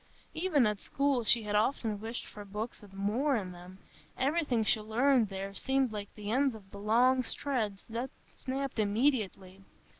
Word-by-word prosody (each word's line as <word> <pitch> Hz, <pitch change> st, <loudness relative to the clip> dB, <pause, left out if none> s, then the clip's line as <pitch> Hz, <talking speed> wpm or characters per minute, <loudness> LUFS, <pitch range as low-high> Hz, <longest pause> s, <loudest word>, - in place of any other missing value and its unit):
Even 315 Hz, -6 st, +2 dB
at 210 Hz, -1 st, 0 dB
school 275 Hz, -3 st, +1 dB
she 230 Hz, +1 st, +4 dB
had 210 Hz, 0 st, -3 dB
often 215 Hz, -1 st, +1 dB
wished 225 Hz, +2 st, -5 dB
for 210 Hz, -, -9 dB
books 210 Hz, +4 st, -5 dB
with 205 Hz, -2 st, -14 dB
more 215 Hz, +9 st, +1 dB
in 190 Hz, -5 st, -2 dB
them; 180 Hz, +1 st, -11 dB, 0.4 s
everything 270 Hz, -4 st, +1 dB
she 215 Hz, -, +3 dB
learned 235 Hz, +1 st, +3 dB
there 195 Hz, 0 st, -5 dB
seemed 265 Hz, +3 st, +1 dB
like 205 Hz, -2 st, -5 dB
the 210 Hz, 0 st, -5 dB
ends 265 Hz, 0 st, +2 dB
of 195 Hz, -3 st, -14 dB
long 235 Hz, +6 st, +3 dB
threads 225 Hz, -5 st, -2 dB
that 235 Hz, +3 st, -3 dB, 0.3 s
snapped 270 Hz, -1 st, -3 dB
immediately. 205 Hz, -4 st, 0 dB
220 Hz, 160 wpm, -31 LUFS, 205-265 Hz, 0.4 s, she